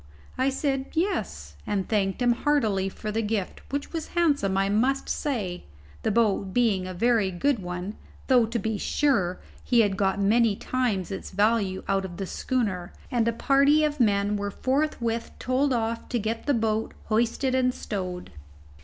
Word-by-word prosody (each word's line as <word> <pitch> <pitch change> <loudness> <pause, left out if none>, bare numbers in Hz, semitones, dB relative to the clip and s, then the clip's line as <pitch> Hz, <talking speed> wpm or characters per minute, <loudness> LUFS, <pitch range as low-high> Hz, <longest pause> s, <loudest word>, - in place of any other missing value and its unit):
I 260 +1 +2
said 270 0 -1
yes, 360 +5 -2
and 195 -2 -1
thanked 200 +1 0
him 245 - +4
heartily 230 -7 +1
for 215 +2 -5
the 220 +2 0
gift, 210 -3 -2
which 285 +3 -4
was 325 -2 -3
handsome, 285 - +2
I 195 0 +2
must 250 +7 +1
say, 205 -12 -2 0.4
the - - 0
boat 205 -3 +1
being 210 -7 +2
a 185 - -5
very 230 0 +2
good 235 +8 0
one, 180 +2 -5 0.3
though, 245 -4 +4
to 235 +2 -2
be 220 -1 -2
sure, 200 -12 +1 0.2
he 240 -2 +4
had 200 -3 +1
got 195 0 +1
many 215 +2 +3
times 215 -7 -1
its 195 - -5
value 205 -1 +1
out 195 0 +1
of 175 -2 -7
the 195 - -3
schooner; 190 -5 -2 0.2
and 235 -2 +1
a - - +3
party 280 +5 +4
of 300 -1 0
men 205 -2 +2
were 200 0 -2
forthwith 250 -2 -1
told 265 +2 +1
off 230 -1 -1
to 245 - 0
get 225 +3 -3
the 285 - +3
boat 220 -1 -1
hoisted 235 +4 0
and 255 -1 +3
stowed. 185 -6 -5
225 Hz, 170 wpm, -26 LUFS, 195-255 Hz, 0.4 s, him